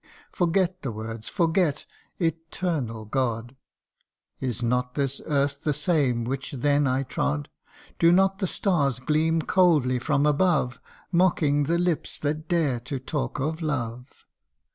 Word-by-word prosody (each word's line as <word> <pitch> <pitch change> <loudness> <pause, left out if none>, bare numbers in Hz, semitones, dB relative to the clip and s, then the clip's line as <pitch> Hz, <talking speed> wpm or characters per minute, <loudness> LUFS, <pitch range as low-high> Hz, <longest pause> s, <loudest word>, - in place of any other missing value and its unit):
Forget 180 +1 +1
the 135 - -3
words 110 +1 -6
forget! 165 -3 +1 0.3
Eternal 165 - -2
God! 120 +1 -2 0.8
Is 125 -3 -3
not 125 +1 0
this 140 -2 -1
earth 140 -1 0
the 150 -2 +1
same 145 -6 +1
which 135 +4 -4
then 145 +2 +2
I 130 +1 +1
trod? 75 - -2 0.5
Do 170 - +6
not 195 +2 +3
the 190 - 0
stars 145 - +1
gleam 155 +4 +1
coldly 150 -10 +3
from 145 +2 +1
above, 150 -5 +2 0.3
Mocking 160 -5 +3
the 170 +4 +1
lips 175 -2 -1
that 155 +2 -3
dare 155 -8 +1
to 130 +4 -5
talk 125 - -3
of 155 +5 -2
love 125 -4 -4
145 Hz, 135 wpm, -26 LUFS, 125-165 Hz, 0.8 s, Do